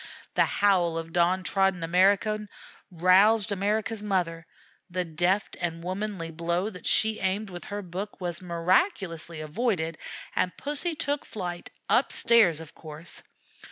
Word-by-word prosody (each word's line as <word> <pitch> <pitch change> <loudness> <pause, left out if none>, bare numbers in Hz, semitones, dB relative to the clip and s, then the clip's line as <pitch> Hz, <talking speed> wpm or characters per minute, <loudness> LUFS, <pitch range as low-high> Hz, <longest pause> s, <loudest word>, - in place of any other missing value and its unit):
The - - +4
howl 180 -5 +2
of 165 0 -6
downtrodden 185 +1 +2
America 200 +5 +2 0.4
roused 195 +5 +4
America's 210 +2 -1
mother. 175 -5 -1 0.4
The 180 0 -2
deft 175 +5 0
and 165 -1 -3
womanly 185 -2 -4
blow 170 +5 -1
that 180 - -8
she 220 0 +3
aimed 195 +2 -1
with 175 -1 -8
her 205 0 -5
book 190 +4 -6
was 175 -2 -4
miraculously 170 - 0
avoided, 165 -1 -1 0.4
and 180 - 0
Pussy 295 +4 -2
took 290 -1 -2
flight, 175 -4 -6 0.2
up - - +3
stairs, 205 -10 +5
of 160 -2 -11
course. 155 +1 -9
185 Hz, 130 wpm, -27 LUFS, 170-210 Hz, 0.4 s, stairs